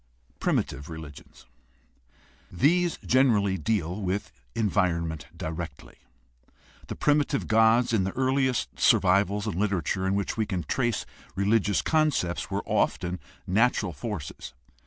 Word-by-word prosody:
a) - - -36
Primitive 70 - -1
religions.— 80 -3 -11 1.1
These 170 - +2
generally 110 -7 +3
deal 90 +1 -1
with 95 +1 -2 0.2
environment 85 -7 0
directly. 80 -4 -6 0.9
The - - -5
primitive 145 -2 +1
gods 115 +2 +4
in 105 -4 +3
the 95 - -2
earliest 130 -1 0
survivals 100 +2 +3
and 110 - -2
literature 95 -1 -1
in 95 - +1
which 100 +2 -2
we 110 -2 0
can 95 -4 -2
trace 120 -3 -1 0.3
religious 100 +1 +2
con 155 -1 +3
cepts 85 - -2
were - - -2
often 90 +1 0 0.3
natural 105 -2 +2
forces. 75 - -6
100 Hz, 120 wpm, -27 LUFS, 90-115 Hz, 1.1 s, gods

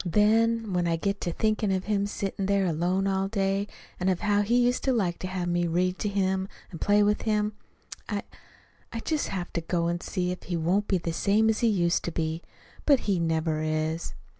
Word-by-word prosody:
Then, 220 +3 +2
when 175 -1 +1
I 165 - +2
get 200 +4 -2
to 175 - -1
thinking 215 +2 0
of 190 -1 0
him 200 -1 0
sitting 195 -1 -3
there 200 -1 +2
alone 180 +3 0
all 195 0 +1
day, 195 -1 0 0.3
and 185 +1 +1
of 185 -2 0
how 205 -1 +2
he 215 +4 +1
used 245 +1 +1
to 265 - +3
like 190 -8 0
to 185 - -4
have 185 -1 -3
me 175 0 +1
read 180 +2 0
to 210 - -1
him 190 -1 0 0.2
and 165 - -9
play 205 0 +4
with 210 0 +2
him, 210 -1 0 0.6
I - - -2 0.7
I 230 - -4
just 310 +2 -1
have 180 -2 -4
to 170 - -1
go 170 +1 -1
and 175 +1 -1
see 180 -2 -2
if 180 - -6
he 175 - -3
won't 180 +6 +1
be 190 - +2
the 165 -1 -3
same 210 +5 +3
as 215 - -2
he 235 - +3
used 175 -5 +2
to 170 - -2
be. 160 0 -2 0.4
But 280 -4 +4
he 195 -4 0
never 160 -1 0
is." 155 +1 -2
190 Hz, 220 wpm, -27 LUFS, 175-210 Hz, 0.7 s, play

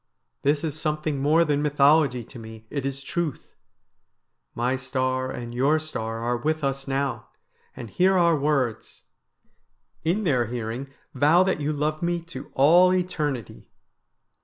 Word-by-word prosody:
This 145 +2 +1
is 155 -1 -3
something 150 -2 -1
more 155 +4 +4
than 145 -1 +1
mythology 145 -3 +3
to 120 - -12
me, 110 0 -11
it 140 -2 -2
is 135 0 -5
truth. 165 -1 -4 1.0
My 125 +2 0
star 130 0 -1
and 120 -2 -6
your 140 +6 +2
star 115 -8 -4
are 120 +1 0
with 155 +5 -1
us 135 0 -2
now, 135 0 -2 0.5
and 120 -3 -7
hear 185 - +2
our 170 -2 +4
words. 140 -6 -1 1.0
In 180 +7 0
their 130 - +1
hearing 120 +3 -4 0.3
vow 160 +5 +4
that 185 -5 -1
you 145 +1 0
love 155 +1 -2
me 175 0 0
to - - -8
all 175 +7 +6
eternity.' 150 - -3
145 Hz, 145 wpm, -25 LUFS, 130-155 Hz, 1.0 s, all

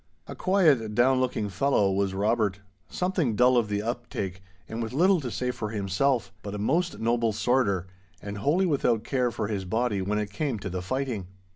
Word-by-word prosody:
A - - -7
quiet, 150 - +2
down 130 +2 +4
looking 125 -5 0
fellow 100 0 +2
was 95 0 0
Robert, 105 -1 +1 0.3
something 180 - 0
dull 125 +3 +5
of 120 -3 +3
the 105 0 -1
uptake, 110 -6 -4 0.3
and 115 +1 -4
with 115 +1 -4
little 180 +4 +4
to 130 - -4
say 125 +2 -2
for 115 -4 -5
himself; 105 +5 0
but 105 0 -6
a - - -3
most 165 - 0
noble 115 0 +1
sworder, 105 -4 +1 0.3
and 100 0 -6
wholly 160 - +2
without 125 -9 +1
care 125 -3 0
for 110 -3 -3
his 100 -3 -2
body 110 +1 0
when 100 +3 -1
it 105 -1 -2
came 130 +2 -2
to 95 -2 -6
the 90 0 -3
fighting. 120 -2 -3
115 Hz, 190 wpm, -27 LUFS, 100-130 Hz, 0.3 s, dull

